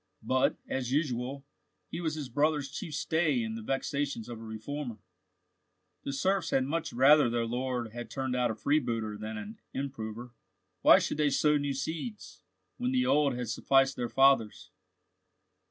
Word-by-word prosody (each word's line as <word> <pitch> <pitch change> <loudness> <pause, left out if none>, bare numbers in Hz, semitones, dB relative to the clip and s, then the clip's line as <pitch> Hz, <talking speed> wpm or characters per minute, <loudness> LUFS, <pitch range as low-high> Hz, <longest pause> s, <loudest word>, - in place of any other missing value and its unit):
But, 130 0 +2
as 130 -2 -2
usual, 135 -2 -1 0.5
he 170 - -4
was 160 -2 -1
his 150 -4 -4
brother's 145 +2 +1
chief 150 0 -5
stay 150 -6 +1
in 110 0 -3
the 115 - -5
vexations 135 0 -2
of 120 -2 -7
a - - -9
reformer. 115 +3 -5 1.1
The - - -2
serfs 185 +5 0
had 130 - +2
much 155 +5 -2
rather 135 +2 +6
their 115 0 0
lord 125 -1 -2
had 120 +1 -7
turned 130 -2 -2
out 125 -1 +2
a 110 - -2
freebooter 115 -5 0
than 110 +1 -6
an 105 +1 -8 0.2
improver. 120 -3 -5 0.5
Why - - +8
should - - -1
they 150 -1 +3
sow 150 +2 +3
new 145 -1 -2
seeds, 165 - -5 0.4
when 250 +1 -1
the 255 0 +2
old 145 - +3
had 125 -2 -4
sufficed 135 +2 +3
their 120 -1 -3
fathers? 135 -5 +3
135 Hz, 165 wpm, -30 LUFS, 120-150 Hz, 1.1 s, Why